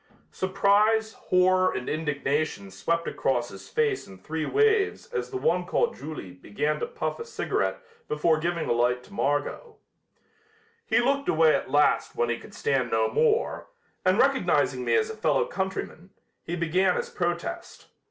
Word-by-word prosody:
Surprise, 205 +3 +2
horror 185 0 +3
and 125 - -4
indignation 150 -7 -2
swept 165 - -1
across 120 -2 -1
his 95 - -11
face 445 -4 0
in 95 - -12
three 155 +11 -4
waves 435 -1 +2
as - - -2
the 390 - -4
one 475 +5 +1
called 475 -1 0
Julie 150 -12 -7
began 105 +11 -2
to - - -2
puff 475 0 -4
a - - -4
cigarette 465 - -2 0.3
after 155 +2 +2
giving 170 +1 -2
a - - 0
light 120 +1 +1
to 200 - -16
Margot. 145 - -2 1.1
He - - +3
looked 275 +3 +1
away 160 -1 +5
at - - -1
last 145 +2 +2
when 120 - 0
he 120 - -1
could - - -13
stand 130 -4 0
no 110 -1 +1
more, 465 0 +1 0.4
and - - +3
recognizing - - +2
me - - +2
as 445 0 +1
a - - -7
fellow 475 - +1
countryman, 190 - -4 0.3
he 170 - -4
began 175 +3 +2
his 475 0 -3
protest. - - -4
170 Hz, 160 wpm, -26 LUFS, -, 1.1 s, away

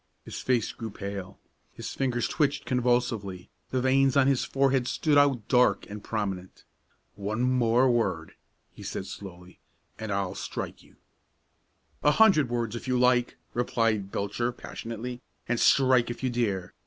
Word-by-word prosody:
His - - -6
face 125 -4 0
grew 115 -1 -6
pale. 100 -2 -6 0.4
His - - -6
fingers 125 -3 0
twitched 145 -3 0
convulsively, 120 -6 0 0.2
the 130 - 0
veins 135 +1 +3
on 135 - +5
his 135 -2 +2
forehead 135 -2 +1
stood 150 +1 +1
out 140 -6 +3
dark 125 -6 +3
and 105 0 -7
prominent. 95 -4 -4 0.5
"One 105 +4 -3
more 125 0 +3
word," 120 -2 0 0.4
he - - -13
said 95 - -5
slowly, 90 -2 -10 0.4
"and 110 -1 -4
I'll 100 -2 -1
strike - - -5
you." - - -22 1.1
"A 150 - +4
hundred 185 - +5
words 120 -2 -2
if 120 - -7
you 125 -1 +1
like," 125 -1 +2 0.2
replied 115 -4 0
Belcher, 105 +5 -1
passionately, 120 +1 -7 0.3
"and 120 0 0
strike 130 -3 +4
if 120 +2 -6
you 130 - +1
dare! 100 -7 -1
120 Hz, 150 wpm, -27 LUFS, 105-130 Hz, 1.1 s, on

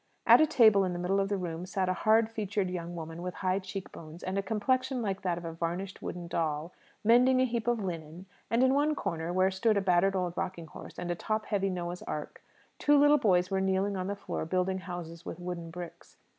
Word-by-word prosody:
At - - +8
a 310 - +5
table 220 -9 +6
in 185 -1 -1
the - - -4
middle 180 +3 0
of 195 0 0
the 200 - 0
room 175 -1 -4
sat 190 0 -1
a 185 - +2
hard 220 +3 +3
featured 205 -3 -2
young 175 -1 -5
woman, 165 0 -7
with 180 0 -5
high 185 0 0
cheek 190 0 -7
bones, 160 +1 -11
and 185 - -3
a 200 - +1
complexion 255 +5 0
like 195 -2 -2
that 175 -2 -1
of 175 - -7
a 165 - -4
varnished 175 +3 -4
wooden 175 -1 -5
doll, 160 0 -2 0.3
mending 250 +4 +5
a 260 - +4
heap 235 -2 -2
of 240 -3 +1
linen; 170 0 -6 0.2
and 235 +2 +3
in 260 0 +4
one 295 +2 +2
corner, 165 - -3
where 185 +1 +3
stood 215 +3 +2
a - - +2
battered 190 +1 +3
old 180 -2 -1
rocking 175 -2 -4
horse 155 - -11
and 175 0 -3
a - - -1
top 215 +4 -2
heavy 195 -2 0
Noah's 175 -1 -4
Ark, 150 -1 -6 0.4
two 295 0 +4
little 290 +1 +6
boys 180 -5 +2
were 190 0 +1
kneeling 190 +1 +1
on 185 -1 -3
the 200 - -2
floor, 200 - -4
building 185 +3 0
houses 175 -2 -7
with - - -7
wooden 175 -2 -5
bricks. 175 0 -10
185 Hz, 235 wpm, -30 LUFS, 175-210 Hz, 0.4 s, At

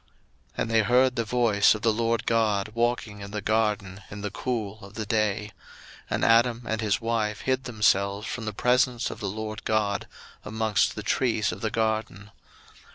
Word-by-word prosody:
01:003:008 - - -35 0.5
And 115 - -1
they 110 -1 +5
heard 125 +4 +3
the 115 - 0
voice 110 -3 +3
of 105 - -7
the 115 -2 +3
LORD 115 0 0
God 105 -3 +1
walking 115 -3 -1
in 100 - -7
the 105 +1 -4
garden 105 -2 0
in 100 +1 -8
the 105 -1 -4
cool 110 -3 -4
of 100 +1 -12
the 110 - -3
day: 105 -1 0 0.6
and - - 0
Adam 115 +1 +4
and 110 0 -2
his 105 -2 +1
wife 115 -2 -1
hid 130 0 -1
themselves 100 -3 +1
from 115 +1 -5
the 110 - -2
presence 125 +2 +1
of - - -8
the 100 -4 -3
LORD 110 +3 -5
God 105 -2 0 0.4
amongst 110 -1 0
the 105 - -5
trees 110 -2 +1
of 90 +2 -8
the 110 - 0
garden. 110 -3 -2
110 Hz, 185 wpm, -26 LUFS, 105-115 Hz, 0.6 s, they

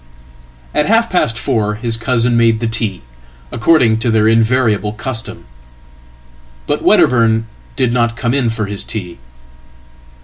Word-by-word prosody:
*At 150 - +1
half 230 +2 +2
past 115 -11 0
four 105 -3 -1
his 115 +1 -1
cousin 120 0 0
made 115 -1 +3
the 115 - -3
tea, 110 - -3 0.5
according 115 -4 +2
to 115 - -1
their 110 -1 +2
invariablecustom. 110 0 0 1.2
But - - -1
Wedderburn 115 -2 +3 0.3
did 120 -2 0
not 120 -1 0
come 120 -1 -1
in 130 -4 +1
for 110 -1 -3
his 100 0 -4
tea." 90 -6 -6
115 Hz, 130 wpm, -15 LUFS, 110-125 Hz, 1.2 s, made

